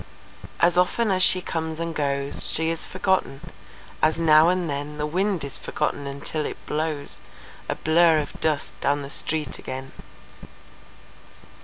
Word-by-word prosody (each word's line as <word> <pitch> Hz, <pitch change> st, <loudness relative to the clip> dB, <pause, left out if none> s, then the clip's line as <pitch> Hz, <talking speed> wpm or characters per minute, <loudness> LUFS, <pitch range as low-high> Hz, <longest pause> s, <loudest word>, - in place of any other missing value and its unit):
As 175 Hz, +1 st, +4 dB
often 210 Hz, +4 st, +2 dB
as 185 Hz, -1 st, +2 dB
she 185 Hz, 0 st, +5 dB
comes 160 Hz, -1 st, -3 dB
and 165 Hz, 0 st, -2 dB
goes 140 Hz, -2 st, -1 dB
She 160 Hz, +1 st, +1 dB
is 165 Hz, -, -3 dB
forgotten, 185 Hz, -7 st, 0 dB, 0.6 s
as 155 Hz, +1 st, +3 dB
now 160 Hz, 0 st, +6 dB
and 180 Hz, -1 st, +1 dB
then 145 Hz, +1 st, -4 dB
The 150 Hz, -, -1 dB
wind 185 Hz, +2 st, 0 dB
is 140 Hz, -, -5 dB
forgotten 140 Hz, -, -2 dB
until 140 Hz, +2 st, -3 dB
it -, -, -4 dB
blows 155 Hz, -1 st, -2 dB, 0.5 s
A -, -, 0 dB
blur 165 Hz, 0 st, +4 dB
of 150 Hz, -, -4 dB
dust 155 Hz, -2 st, -1 dB
down 145 Hz, 0 st, +1 dB
the 140 Hz, -, -7 dB
street 150 Hz, -2 st, -2 dB
again. 130 Hz, +1 st, -6 dB
155 Hz, 150 wpm, -24 LUFS, 145-170 Hz, 0.6 s, now